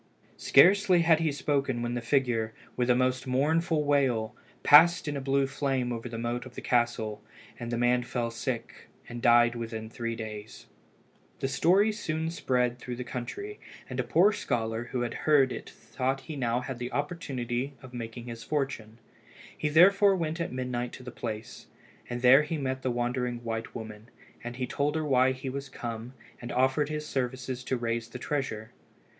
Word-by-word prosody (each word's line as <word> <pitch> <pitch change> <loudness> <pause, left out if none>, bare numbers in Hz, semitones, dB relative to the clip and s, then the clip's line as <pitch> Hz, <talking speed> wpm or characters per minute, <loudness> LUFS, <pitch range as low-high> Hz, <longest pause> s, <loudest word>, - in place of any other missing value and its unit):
Scarcely 185 +4 +5
had 165 -1 +5
he 160 -2 +1
spoken 140 -4 -1
when 120 0 -2
the 120 - -2
figure, 115 -3 0 0.2
with 125 0 0
a 125 - +5
most 130 +1 0
mournful 155 +5 +1
wail, 130 -7 +1 0.3
passed 165 +3 +7
in 145 - -2
a 140 - -3
blue 135 +1 +2
flame 135 -2 -1
over 115 +1 -5
the 115 - -6
moat 120 +1 -2
of 125 - -15
the - - -5
castle, 115 -3 0 0.4
and 120 -1 -5
the 120 - -1
man 120 +1 +3
fell 120 -1 -3
sick, 115 0 -5 0.2
and 120 0 -7
died 120 0 +5
within 115 -2 -6
three 115 -1 -3
days. 110 -1 -8 0.7
The - - -2
story 190 +10 +3
soon 160 -6 -3
spread 125 -6 0
through 125 0 -5
the 125 - -5
country, 400 - -6 0.3
and - - -5
a - - +2
poor 185 +6 +4
scholar 115 - -2
who 125 0 -3
heard 135 +2 +2
it - - -6
thought 135 +1 -3
he 155 - -8
had 145 - -6
now 120 0 0
an 125 -2 -4
opportunity 135 -4 -3
of 130 -1 -12
making 115 0 -6
his 115 -1 -7
fortune. 135 -7 -3 0.6
He 150 - -1
therefore 195 +5 +6
went 165 -1 -2
at 170 - -3
midnight 125 -1 -3
to 130 - -10
the 125 - -7
place, 110 -2 -6 0.4
and 120 0 -4
there 130 +3 +8
he 155 +2 -3
met 130 -2 -2
with - - -21
the 130 - -1
wandering 120 0 -2
white 115 0 -4
woman, 110 0 -8 0.3
and 120 0 -6
he 130 0 -2
told 145 +4 -1
her 160 -1 -1
why 130 -2 +4
he 130 +1 -6
was 135 0 -5
come, 115 0 -6 0.3
and 120 - -6
offered 130 +3 +2
his 150 0 -3
services 130 -2 -3
to 130 - 0
raise 115 -1 -2
the - - -7
treasure. 125 -6 -3
125 Hz, 185 wpm, -28 LUFS, 120-145 Hz, 0.7 s, there